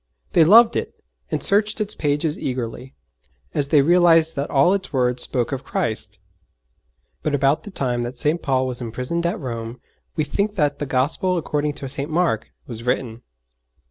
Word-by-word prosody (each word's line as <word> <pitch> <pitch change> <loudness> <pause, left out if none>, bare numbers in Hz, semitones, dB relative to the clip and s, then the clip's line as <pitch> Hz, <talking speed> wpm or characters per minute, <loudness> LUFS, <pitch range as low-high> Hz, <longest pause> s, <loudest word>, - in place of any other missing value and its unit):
They 165 - +6
loved 225 +8 +7
it - - -4 0.3
and - - -2
searched 210 +2 +2
its 210 -1 -1
pages 150 +1 -1
eagerly, 125 0 -5 0.6
as 140 - 0
they 145 -1 +4
realized 165 -1 +4
that 140 +1 -3
all 140 +7 +4
its 200 -2 -3
words 125 -2 0
spoke 125 -1 -1
of 135 -1 -4
Christ! 110 - -2 1.0
But 150 -2 0
about 140 +5 +1
the - - -7
time 125 -9 -1
that 120 +2 -5
St. 160 +2 +1
Paul 130 -2 +1
was 125 -1 -3
imprisoned 125 +9 -2
at 195 +5 -2
Rome 115 -3 -6 0.4
we 155 - +1
think 200 +8 -1
that 150 -5 0
the 145 - -3
Gospel 145 +8 0
according 150 -2 -1
to 140 - -6
St. 140 +3 -5
Mark 160 -9 0
was 115 -2 -8
written. 120 -2 -2
145 Hz, 175 wpm, -22 LUFS, 125-170 Hz, 1.0 s, loved